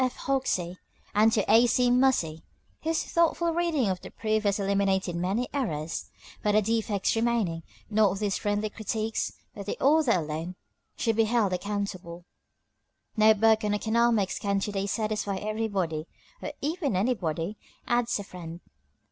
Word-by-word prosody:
F. 255 -1 0
Hoxie 190 -10 -1 0.4
and 215 +2 +5
to 210 -3 +1
A. 235 +2 +6
C. 245 +1 +3
Muhse, 245 -12 +2 0.4
whose 320 +1 0
thoughtful 335 0 +1
reading 330 -8 +1
of 185 -2 -1
the - - -9
proof 215 -1 -1
has 200 0 +2
eliminated 195 -2 +1
many 195 +8 -1
errors. 165 - -3 0.3
For 210 - +2
the 215 - +6
defects 220 -2 0
remaining, 225 -8 0 0.3
not 210 -3 +2
these 205 -1 -1
friendly 210 0 -1
critics, 220 +1 -2 0.2
but 200 -1 -8
the - - -2
author 290 -3 +4
alone, 165 +1 -3 0.4
should 225 -1 0
be 225 - +4
held 215 -4 +1
accountable. 180 -3 -4 0.9
No 215 0 +6
book 220 +1 +4
on 210 0 +1
economics 220 -2 +1
can 200 -1 0
to 210 - -2
day 195 0 -2
satisfy 210 -1 -1
everybody 195 -6 -2 0.3
"Or - - -4
even 300 - -1
anybody," 185 -3 -1 0.3
adds 240 0 +1
a 205 - -5
friend. 170 -3 -9
210 Hz, 150 wpm, -27 LUFS, 190-235 Hz, 0.9 s, A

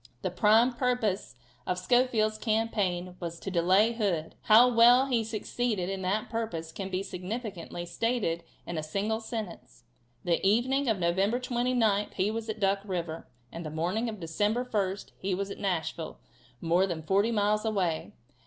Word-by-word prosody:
The 185 - -1
prime 220 +6 +4
purpose 240 - -1 0.3
of 180 - 0
Schofield's 215 +1 +2
campaign 205 -5 -1
was 170 -1 -5
to 195 - -5
delay 190 +6 +4
Hood. 190 -9 -1
How 225 +3 +8
well 245 +2 +6
he 245 -4 +1
succeeded 215 -3 -2
in 195 -1 -3
that 195 +4 -1
purpose 195 -9 -4
can 195 +3 -5
be 185 +1 -2
significantly 190 -2 -5
stated 175 -2 -1 0.2
in 170 -2 -3
a - - -2
single 200 +8 -1
sentence: 220 - -7 0.4
The 170 -2 0
evening 245 +7 +2
of 220 - +2
November 190 +7 +1
29th 240 -4 +1
he 195 +2 +1
was 225 0 -4
at 220 0 -4
Duck 195 -1 +2
river, 170 -5 -4 0.2
and 170 - -6
the 155 - -5
morning 180 +10 -1
of 215 -2 -7
December 205 +9 0
1st 200 -5 -2
he 190 -1 -1
was 200 +1 -3
at - - -7
Nashville, 175 - -2 0.4
more 175 +3 +2
than 165 -4 -4
forty 195 +7 +2
miles 210 -1 +1
away. 190 -7 -1
205 Hz, 160 wpm, -29 LUFS, 180-225 Hz, 0.4 s, How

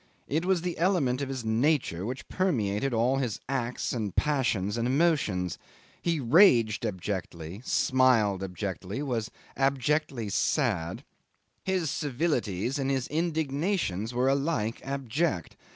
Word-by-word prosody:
It 160 +4 0
was 185 -2 +2
the 175 -2 -3
element 160 -8 +2
of 140 - -2
his 130 -4 -4
nature 110 - +1
which 130 +2 -5
permeated 135 - 0
all 120 +3 +2
his 125 -6 -2
acts 125 -2 -2
and 105 -6 -3
passions 120 -9 +1
and 115 0 0
emotions; 130 - +1 0.4
he 170 -2 0
raged 120 - +5
abjectly, 95 -2 -5
smiled 125 -8 +3
abjectly, 95 - -4
was 120 -5 -2 0.3
abjectly 135 -2 0
sad; 100 - 0 0.6
his 185 -5 0
civilities 130 - -1
and 135 0 0
his 135 -2 0
indignations 155 - -1
were 125 +2 +1
alike 135 -5 0
abject. 135 - -2
130 Hz, 120 wpm, -28 LUFS, 105-150 Hz, 0.6 s, raged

